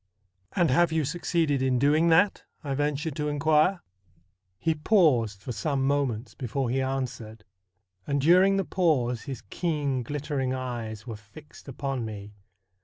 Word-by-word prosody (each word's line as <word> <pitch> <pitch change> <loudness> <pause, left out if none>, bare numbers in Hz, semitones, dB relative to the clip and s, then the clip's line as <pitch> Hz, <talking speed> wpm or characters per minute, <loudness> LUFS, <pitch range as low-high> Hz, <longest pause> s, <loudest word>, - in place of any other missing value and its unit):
' 95 +1 -49
And 175 -5 +2
have 170 +5 +3
you 160 -2 +1
succeeded 160 -2 0
in 130 -1 +2
doing 150 +6 +3
that? 175 +5 +3
' - - -42
I 140 -2 -2
ventured 145 +2 -1
to 150 -1 -1
inquire. 155 +5 +2 0.7
He 160 +9 0
paused 145 - +2
for 125 - -5
some 135 +4 -1
moments 135 -5 -1
before 125 0 -3
he 135 +1 +1
answered, 125 -5 -4 0.6
and 140 0 0
during 185 +6 +5
the 195 - 0
pause 130 -10 +1
his 130 -4 -6
keen 145 -6 -1
glittering 140 0 -2
eyes 115 -4 -5
were 115 -3 -6
fixed 110 +11 -16
upon 135 -1 -3
me. 105 -2 -7
140 Hz, 155 wpm, -27 LUFS, 125-155 Hz, 0.7 s, during